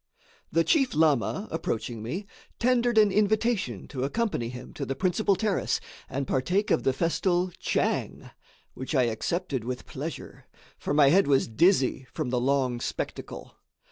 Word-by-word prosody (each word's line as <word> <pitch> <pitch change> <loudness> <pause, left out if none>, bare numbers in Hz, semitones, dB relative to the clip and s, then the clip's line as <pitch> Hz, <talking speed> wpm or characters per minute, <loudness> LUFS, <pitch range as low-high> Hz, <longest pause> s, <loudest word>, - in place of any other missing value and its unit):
The 165 +1 +3
chief 270 - +2
lama, 155 - +2
approaching 115 -7 -3
me, 165 - -4 0.3
tendered 240 -1 +2
an 210 -2 +6
invitation 210 - +1
to 130 -3 -4
accompany 145 - -1
him 125 +1 -9
to 145 - -5
the 135 0 -3
principal 195 +4 +1
terrace 200 +1 0 0.3
and 140 +1 -2
partake 180 +11 0
of - - +3
the 135 - +2
festal 175 +5 0
"tchang"; - - -1 0.4
which 130 +4 -5
I 130 - +4
accepted 130 - -2
with 125 +1 -5
pleasure, 150 +4 -7 0.3
for 145 - -2
my 145 -2 +6
head 190 +4 +4
was 140 -2 +3
dizzy 130 - +2
from 125 - -3
the 125 -1 +1
long 130 -2 +1
spectacle. - - -5
155 Hz, 150 wpm, -27 LUFS, 130-195 Hz, 0.4 s, an